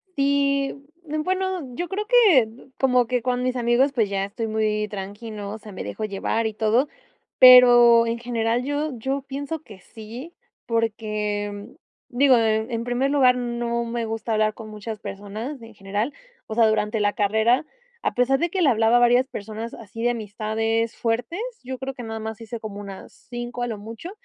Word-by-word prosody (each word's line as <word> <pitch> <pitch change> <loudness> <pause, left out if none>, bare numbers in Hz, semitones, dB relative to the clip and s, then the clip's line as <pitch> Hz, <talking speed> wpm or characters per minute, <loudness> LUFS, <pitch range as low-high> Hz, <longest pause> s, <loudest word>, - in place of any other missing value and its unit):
Sí, 280 0 +1 0.5
bueno, 370 -6 -2
yo 350 +6 -3
creo 410 +2 -3
que, 420 - +5 0.3
como 250 -2 +3
que 250 -1 -1
con 250 0 0
mis 255 0 -1
amigos, 245 +3 +2
pues 220 -6 +1
ya 195 -1 -1
estoy 205 +3 -5
muy 215 -1 0
tranqui, 205 +3 -7
¿no?, 205 -1 -6
o - - -6
sea, 215 -1 -12
me 185 - -6
dejo 215 - -4
llevar 215 +2 -1
y 220 - -1
todo. 225 +6 +2 0.5
Pero 240 -2 +9
en 230 +1 -2
general 235 0 -1
yo 290 +3 -2
yo 270 +4 -2
pienso 280 +3 -5
que 205 -8 -13
sí, 230 - -10 0.3
porque, 210 -3 -2 0.4
digo, 260 0 +4
en 220 +1 +1
en 230 0 -2
primer 245 +3 0
lugar 260 -3 +5
no 235 -1 -2
me 235 0 -3
gusta 225 +1 -3
hablar 215 0 +2
con 220 0 -10
muchas 215 +1 -7
personas 210 +7 -6
en 225 0 -12
general. 205 +7 -3 0.3
O 220 - -5
sea 230 -1 +5
durante 215 0 0
la 205 0 +2
carrera, 220 +7 +2 0.4
a - - 0
pesar 255 +2 +2
de 345 - 0
que 375 +2 -1
le 310 - +5
hablaba 225 0 +4
a - - +5
varias 245 +2 +4
personas 220 0 -6
así 225 +1 -8
de 240 - +3
amistades 225 +1 -2
fuertes, 235 - -2 0.2
yo 255 0 -6
creo 270 0 -4
que 245 - -7
nada 225 -1 -5
más 220 0 -6
hice 225 +1 -6
como 210 -2 -7
unas 200 -2 -9 0.2
5 240 0 -5
a - - -1
lo 225 -3 -4
mucho 225 - -8
230 Hz, 190 wpm, -23 LUFS, 215-255 Hz, 0.5 s, Pero